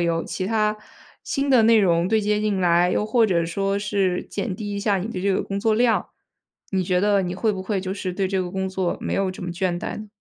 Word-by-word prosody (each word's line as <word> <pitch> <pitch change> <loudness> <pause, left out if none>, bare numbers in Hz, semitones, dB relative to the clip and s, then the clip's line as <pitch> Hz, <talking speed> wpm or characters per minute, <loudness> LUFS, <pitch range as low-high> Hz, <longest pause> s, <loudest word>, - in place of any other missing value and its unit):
有 170 -1 +1
其 185 - -4
它 215 -1 +1 0.5
新 275 0 -1
的 245 -4 +5
内 225 +1 +6
容 170 -2 +2
对 220 +2 +2
接 210 0 0
进 210 -3 0
来， 175 0 +3
又 - - +1
或 225 +1 +3
者 170 -4 +1
说 195 +4 -1
是 200 -3 0
减 200 -2 -4
低 205 +1 -5
一 200 - -3
下 200 -1 +1
你 190 +5 -4
的 185 - -4
这 195 0 +1
个 - - 0
工 195 0 -4
作 220 +1 +2
量， 235 0 +2 0.6
你 190 -2 0
觉 180 0 +1
得 200 0 +3
你 180 0 -3
会 215 +3 0
不 190 - -5
会 190 0 -2
就 185 0 -4
是 190 -2 -4
对 190 0 -1
这 190 -1 0
个 180 0 -4
工 190 0 -2
作 185 -2 -2
没 - - -3
有 195 -1 +1
这 185 - -10
么 175 - -4
倦 175 0 -1
怠 - - -5
呢？ 215 - -8
195 Hz, 280 characters per minute, -23 LUFS, 185-210 Hz, 0.6 s, 内